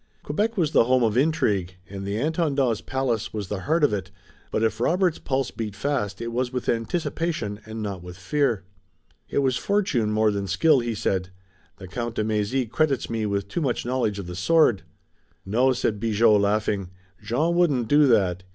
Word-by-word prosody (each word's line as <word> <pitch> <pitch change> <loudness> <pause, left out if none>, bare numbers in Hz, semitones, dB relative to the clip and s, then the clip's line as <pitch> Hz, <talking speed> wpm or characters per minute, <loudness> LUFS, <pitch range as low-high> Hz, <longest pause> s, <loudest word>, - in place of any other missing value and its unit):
Quebec 210 +9 -1
was 160 -5 +1
the 115 - +5
home 130 0 +3
of 110 -2 +1
intrigue, 105 - +1
and 100 0 -7
the 100 +1 -2
Intendant's 140 -5 0
palace 130 -5 -2
was 105 -4 -5
the 105 - -3
heart 155 - 0
of 130 - +4
it, 95 -2 -3 0.4
but 110 - -1
if 110 - 0
Robert's 180 -1 +1
pulse 135 -2 -1
beat 105 -3 -5
fast 115 -7 -2
it 115 - -4
was 125 +1 -1
with 125 -2 -4
anticipation 120 -2 -2
and 110 0 -5
not 100 -4 -4
with 90 0 -10
fear. 115 +1 0 0.7
"It 140 - +1
was 130 -2 +1
fortune 185 - 0
more 110 0 +3
than 100 -1 -3
skill," 145 - +4
he 120 -2 -2
said. 95 -3 -1 0.5
"The 95 - -10
Count 115 +5 -4
de - - 0
Mézy 110 +4 0
credits 135 +1 0
me 110 -2 -1
with 100 -1 -2
too 170 - -3
much 130 -6 -1
knowledge 120 -5 0
of 100 - -5
the 90 0 -7
sword." 120 - +3 0.6
"No," 120 +7 +3
said 110 -4 -1
Bigot, 115 +1 +2
laughing, 100 -2 0 0.3
"Jean 125 +11 0
wouldn't 145 -10 +2
do 145 +3 +5
that. 95 -7 +2
115 Hz, 190 wpm, -24 LUFS, 100-140 Hz, 0.7 s, the